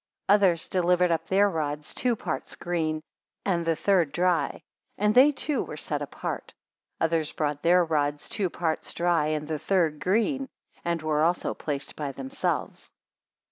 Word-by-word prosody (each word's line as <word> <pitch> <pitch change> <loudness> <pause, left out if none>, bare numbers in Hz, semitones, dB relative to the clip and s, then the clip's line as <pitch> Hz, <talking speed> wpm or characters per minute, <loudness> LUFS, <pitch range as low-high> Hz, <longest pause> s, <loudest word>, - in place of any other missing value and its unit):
8 200 - +6
Others 190 -5 +3
delivered 180 -1 +3
up 165 - -1
their 200 +2 +4
rods 150 -4 -3
two 245 -1 +1
parts 170 -7 -4
green, 160 -3 -2 0.4
and 175 -4 +1
the 165 -1 +1
third 175 -4 +2
dry; 180 -1 0 0.3
and 210 +1 +2
they 265 +5 +7
too 290 +1 -2
were - - -6
set - - -3
apart. - - -5 0.4
Others 160 -2 0
brought 145 -2 -1
their 175 +1 +5
rods 145 -2 -1
two 195 -3 -1
parts 160 -2 -2
dry, 170 -3 +2
and 155 -1 -2
the 155 -1 -2
third 160 -3 +1
green; 230 - +1 0.3
and 170 -2 -1
were 155 -1 +1
also 170 +2 +1
placed 140 -2 -4
by 145 -2 -3
themselves. 135 0 -3
170 Hz, 160 wpm, -27 LUFS, 155-190 Hz, 0.4 s, they